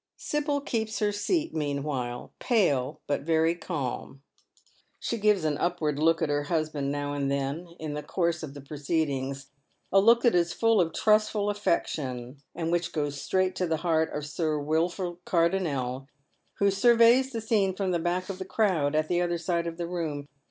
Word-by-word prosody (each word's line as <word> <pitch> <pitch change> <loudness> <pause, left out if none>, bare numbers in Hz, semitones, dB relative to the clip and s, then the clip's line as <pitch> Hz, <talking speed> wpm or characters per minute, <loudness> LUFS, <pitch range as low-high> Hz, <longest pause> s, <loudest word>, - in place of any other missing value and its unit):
Sibyl 295 -1 -1
keeps 225 -4 -2
her 210 -2 +1
scat 310 - -1
meanwhile, 140 -5 -3
pale 150 - +1
but 145 - -1
very 160 +2 +2
calm. 140 -5 -5 0.8
She 235 - -2
gives 210 -4 +3
an 150 -2 0
upward 155 -5 0
look 165 +1 +3
at 155 - 0
her 145 0 0
husband 155 -3 -1
now 145 0 -2
and 140 -1 -1
then 140 +5 -2
in 155 -2 -4
the 150 - -3
course 170 0 -1
ofi 145 -3 -7
the 140 - -8
proceedings, 140 -2 -2 0.4
a 195 - +6
look 230 +4 +5
that 240 - +5
is 175 -1 +2
full 225 -1 +3
of 165 -2 0
trustful 215 +1 +2
afEection, 135 - -2
and 165 0 -2
which 175 0 0
goes 145 -2 -2
straight 185 0 +1
to 180 - 0
the 160 -1 0
heart 160 -1 +2
of 150 -1 -4
Sir 155 +1 -1
Wilford 170 +4 -1
Cardonnel, 155 -8 0 0.5
who 200 0 +3
surveys 235 +5 +5
the 230 - -3
scene 210 -4 +1
fi 195 - -3
om 185 - 0
the 175 - +1
back 175 +2 -1
of 195 -2 -6
the - - -3
crowd 180 -8 +1
at 155 0 +2
the 175 +1 +1
other 175 -1 0
side 170 0 -1
of 165 0 -5
the 175 - -3
room. 160 -5 -4
165 Hz, 185 wpm, -28 LUFS, 145-195 Hz, 0.8 s, a